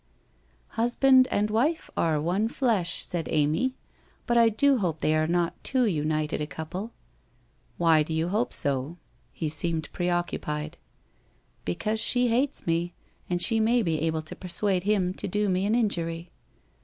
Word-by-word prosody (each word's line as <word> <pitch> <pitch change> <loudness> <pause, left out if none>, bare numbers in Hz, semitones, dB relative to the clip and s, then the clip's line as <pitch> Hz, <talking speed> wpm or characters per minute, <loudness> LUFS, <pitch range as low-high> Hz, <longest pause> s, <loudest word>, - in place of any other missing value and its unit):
' - - -37
Husband 255 +2 +5
and 210 +1 0
wife 285 +10 0
are 160 -2 +1
one 180 +8 0
flesh,' 220 -9 0
said 170 -3 -3
Amy. 155 - +1 0.2
' - - -35
But 240 - 0
I 230 -1 +6
do 270 +4 +2
hope 170 -6 -1
they 155 - +1
are 155 0 +1
not 175 0 -1
too 260 -2 +2
united 155 -4 -1
a 150 - -2
couple.' 180 +9 -6 0.5
' 120 +2 -38
Why 165 -2 +4
do 150 - -3
you 160 +2 0
hope 220 +6 0
so? 140 +4 -1 0.2
' - - -37
He 160 - -4
seemed 160 +1 -2
preoccupied. 175 -4 -2 0.4
' - - -39
Because 215 - -2
she 245 +2 +1
hates 255 +5 0
me, 170 +1 -1 0.3
and 175 -1 0
she 225 +5 +4
may 230 +2 +3
be 160 -4 -1
able 160 -1 -1
to 155 - -9
persuade 185 +1 -1
him 195 -3 +1
to - - -5
do 210 +2 0
me 190 +1 +1
an 215 - +2
injury.' 170 -7 -1
175 Hz, 175 wpm, -26 LUFS, 160-220 Hz, 0.5 s, I